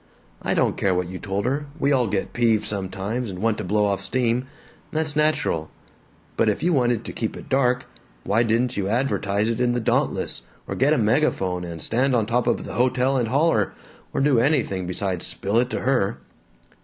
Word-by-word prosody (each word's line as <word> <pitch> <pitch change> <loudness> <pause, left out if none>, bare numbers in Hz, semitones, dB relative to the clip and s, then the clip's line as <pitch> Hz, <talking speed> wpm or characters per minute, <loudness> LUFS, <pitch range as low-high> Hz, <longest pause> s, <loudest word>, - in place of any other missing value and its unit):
I - - 0
don't - - +1
care 95 -2 +1
what 90 -1 -1
you 90 0 -6
told 100 +1 -2
her 140 +3 -1
we 140 -2 +1
all 125 -4 +3
get 100 -1 -2
peeved 115 -3 +2
sometimes 100 +4 -3
and 90 - -6
want 110 +2 0
to - - -3
blow 105 +3 +1
off 100 -1 -1
steam, 125 +2 0 0.4
that's 155 -1 -1
natural 150 - +1 0.7
but 115 - +3
if 105 - -1
you 175 +1 +3
wanted 120 -4 +1
to - - -6
keep 110 - -3
it - - -11
dark, 125 -2 +2 0.4
why 105 +4 +2
didn't 120 +2 +1
you 100 -2 0
advertise 105 -3 0
it 115 0 -1
in 120 -1 +2
the 120 - 0
Dauntless, 110 - 0 0.3
or - - -3
get - - +3
a - - +2
megaphone 90 -1 +1
and 85 -1 -6
stand 125 - +1
on 115 -3 +2
top 120 +2 0
of - - 0
the - - -7
hotel 130 +2 +2
and 120 -3 +1
holler, 150 +8 +2 0.4
or - - -1
do 135 -4 +4
anything 115 - +1
besides 90 -1 -1
spill 100 +4 0
it 125 +1 +1
to - - -3
her!" 120 -5 +1
115 Hz, 205 wpm, -23 LUFS, 100-130 Hz, 0.7 s, do